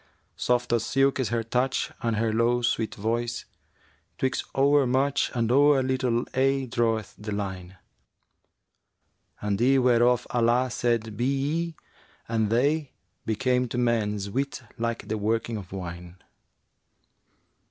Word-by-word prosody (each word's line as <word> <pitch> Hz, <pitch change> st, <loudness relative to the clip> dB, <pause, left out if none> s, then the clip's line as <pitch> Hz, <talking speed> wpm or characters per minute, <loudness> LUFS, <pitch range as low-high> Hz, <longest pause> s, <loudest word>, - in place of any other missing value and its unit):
Soft 125 Hz, -1 st, 0 dB
as 115 Hz, -2 st, +2 dB
silk 135 Hz, 0 st, +2 dB
is 125 Hz, -5 st, 0 dB
her 115 Hz, 0 st, -1 dB
touch 125 Hz, +3 st, 0 dB
and 115 Hz, -3 st, 0 dB
her 110 Hz, 0 st, 0 dB
low 120 Hz, +2 st, +2 dB
sweet 115 Hz, -2 st, 0 dB
voice 115 Hz, +3 st, -2 dB, 0.4 s
* -, -, -36 dB
Twixt 130 Hz, 0 st, -1 dB
o'er 140 Hz, 0 st, +4 dB
much 135 Hz, +3 st, +1 dB
and 115 Hz, -1 st, +1 dB
o'er 140 Hz, 0 st, +5 dB
little 130 Hz, -2 st, 0 dB
aye 135 Hz, +1 st, +2 dB
draweth 115 Hz, -3 st, 0 dB
the 105 Hz, 0 st, -6 dB
line: 95 Hz, -2 st, -5 dB, 1.7 s
And 105 Hz, 0 st, -1 dB
eyne 130 Hz, +1 st, +4 dB
whereof 120 Hz, 0 st, +3 dB
Allah 120 Hz, +1 st, +2 dB
said 115 Hz, -2 st, -1 dB
'Be 120 Hz, +4 st, -1 dB
ye!' 150 Hz, +5 st, -1 dB, 0.5 s
and 110 Hz, -2 st, 0 dB
they 140 Hz, +5 st, +1 dB, 0.2 s
* -, -, -48 dB
Became 125 Hz, +3 st, +1 dB
to 120 Hz, -, -5 dB
man's 105 Hz, -4 st, 0 dB
wit 135 Hz, +1 st, -2 dB
like 115 Hz, 0 st, -3 dB
the 110 Hz, 0 st, -2 dB
working 115 Hz, +2 st, -1 dB
of 95 Hz, -4 st, -9 dB
wine.' 90 Hz, -2 st, -7 dB
120 Hz, 140 wpm, -26 LUFS, 110-130 Hz, 1.7 s, o'er